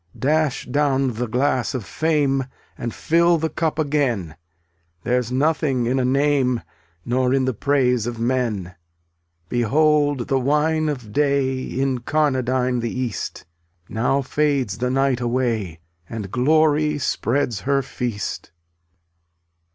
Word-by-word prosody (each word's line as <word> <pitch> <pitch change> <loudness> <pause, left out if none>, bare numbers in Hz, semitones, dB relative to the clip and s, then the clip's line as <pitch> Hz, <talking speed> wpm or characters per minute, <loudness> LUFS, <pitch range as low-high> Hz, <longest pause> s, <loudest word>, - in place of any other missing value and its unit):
283 140 - +1
Dash 155 -4 0
down 135 -3 +2
the 120 +2 -3
glass 130 +2 0
of 120 -6 -4
fame 140 - +1 0.3
And 120 - -4
fill 170 +5 +3
the 160 0 -2
cup 160 -2 -1
again; 135 - 0 0.7
There's 125 -1 0
nothing 135 -2 +1
in 130 +3 +1
a - - +1
name 135 -2 +2 0.4
Nor 125 +1 +1
in 135 -1 +1
the 130 - 0
praise 125 -2 +1
of 120 -1 -4
men. 115 -7 -1 0.7
Behold 145 +2 +2
the 135 - +1
wine 150 +4 +1
of 125 -8 -5
day 140 -2 +1
Incarnadine 130 -1 0
the 115 - -2
east! 125 -5 -4 0.4
Now 125 +5 0
fades 135 -7 0
the 125 +1 0
night 135 -1 +1
away 115 -8 -1 0.3
And 105 -4 -6
Glory 150 +3 +3
spreads 125 -4 -1
her 135 +2 +1
feast. 120 -5 -4
130 Hz, 125 wpm, -22 LUFS, 120-145 Hz, 0.7 s, fill